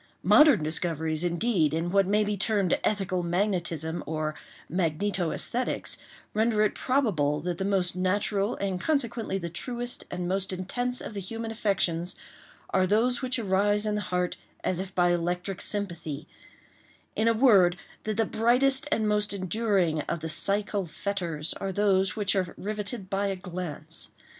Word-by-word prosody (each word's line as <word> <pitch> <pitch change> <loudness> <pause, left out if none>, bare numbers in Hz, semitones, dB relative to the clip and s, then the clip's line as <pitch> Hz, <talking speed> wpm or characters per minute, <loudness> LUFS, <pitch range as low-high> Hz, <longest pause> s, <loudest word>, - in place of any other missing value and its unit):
Modern 295 - +6
discoveries, 160 0 0
indeed, 170 -3 +1
in 170 +2 -1
what 195 -1 +4
may 210 +2 +3
be 210 0 -1
termed 200 -2 +2
ethical 195 -3 0
magnetism 175 -3 -1
or 155 -1 -2 0.3
magnetoesthetics, 185 +7 -1 0.4
render 220 0 +2
it 215 - +2
probable 185 - +1
that 175 +1 -3
the 190 - -1
most 190 -3 +1
natural, 200 +3 +1
and, 190 -2 -2
consequently, 235 -9 0
the 170 -3 -4
truest 245 +6 -4
and 180 -1 -3
most 190 +1 -1
intense 245 +7 -2
of - - -6
the 200 - -3
human 225 +4 -5
affections 185 -5 0 0.6
are 185 -1 +3
those 235 +6 +2
which 255 -1 -1
arise 205 0 +2
in 210 - 0
the 210 - -1
heart 180 -1 -1 0.3
as 180 - 0
if 190 0 -5
by 175 -1 +4
electric 175 +2 -1
sympathy—in 175 +3 -6
a 230 - +5
word, 200 -8 +5 0.3
that 215 -1 -2
the 225 - +3
brightest 265 +7 +2
and 220 -7 +2
most 210 -1 +1
enduring 185 -5 +1
of 170 - -2
the 160 - -4
psychal 200 +2 0
fetters 170 -3 -2
are 195 - -1
those 190 -1 +2
which 205 -2 +1
are 185 -3 -1
riveted 210 0 -4
by 200 +1 0
a 195 - -1
glance. 175 -4 -4
195 Hz, 155 wpm, -28 LUFS, 175-215 Hz, 0.6 s, Modern